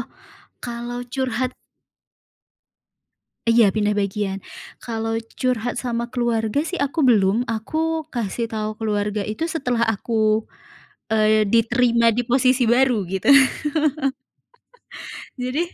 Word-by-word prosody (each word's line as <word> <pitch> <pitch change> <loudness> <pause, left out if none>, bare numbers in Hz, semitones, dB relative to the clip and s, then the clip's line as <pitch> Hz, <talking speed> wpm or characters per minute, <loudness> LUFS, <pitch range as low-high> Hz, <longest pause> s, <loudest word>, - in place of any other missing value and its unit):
Oh, - - -6 0.6
kalau 240 0 -5
curhat 255 -1 -1 2.0
iya, 230 -3 +5
pindah 210 0 0
bagian. 200 -1 -2 0.4
Kalau 225 -1 -3 0.2
curhat 245 -1 -1
sama 235 -1 -3
keluarga 235 +2 0
sih 365 0 -4
aku 285 +3 -1
belum. 220 0 +3
Aku, 315 +8 -2
kasih 230 -2 -3
tahu 215 -1 -3
keluarga 210 -1 -2
itu 215 +10 -3
setelah 250 -8 0
aku, 220 0 +1 0.7
eee, 215 0 +3
diterima 235 +2 +3
di 235 +2 0
posisi 255 0 +3
baru 240 -3 +3
gitu. 190 +7 -1 2.1
Jadi 255 +3 -3
230 Hz, 105 wpm, -22 LUFS, 215-250 Hz, 2.1 s, iya